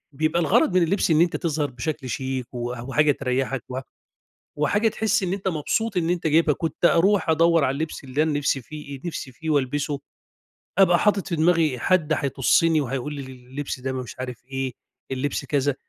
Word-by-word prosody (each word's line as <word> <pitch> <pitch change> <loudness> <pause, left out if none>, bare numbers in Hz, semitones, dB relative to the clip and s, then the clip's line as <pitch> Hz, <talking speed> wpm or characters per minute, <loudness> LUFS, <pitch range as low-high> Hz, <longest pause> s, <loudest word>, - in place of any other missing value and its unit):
بيبقى 155 +3 +1
الغرض 165 +3 +3
من 175 - +5
اللبس 175 0 +1
إن 155 +1 +5
أنت 175 - +2
تظهر 155 -4 -1
بشكل 135 +1 -4
شيك 130 0 -3
وح 120 0 -4
وحاجة 150 +3 +3
تريّحَك 130 -2 -1
و 130 0 -3 0.8
وحاجة 205 +10 +2
تحس 220 0 0
إن 185 -1 -1
أنت 195 -1 -2
مبسوط 190 +6 -1
إن 170 -1 +1
أنت 175 -2 -1
جايبها، 155 -1 +4
كنت 165 +1 -4
أروح 180 +1 +4
أدوّر 165 -1 +4
على 130 - +1
اللبس 155 0 -4
اللي 135 +3 0
أنا 155 -1 +1
نِفسي 135 -2 0
فيه 140 -1 -9
نِفسي 150 -6 -5
فيه 160 +6 -5
والبِسه، 145 0 0 0.8
أبقى 180 -3 +5
حاطط 205 -2 +2
في 170 - 0
دماغي 160 -5 +3
حد 165 0 +2
هيطُسّني 150 +4 +2
وهيقول 135 +2 -3
لي 140 - -5
اللبس 130 +2 -6
ده 130 +1 -3
م - - -3
مش 125 - -9
عارف 125 -2 -6
إيه، 135 -1 -3 0.4
اللبس 140 +2 -2
كذا، 145 -1 +1
150 Hz, 185 wpm, -24 LUFS, 135-165 Hz, 0.8 s, من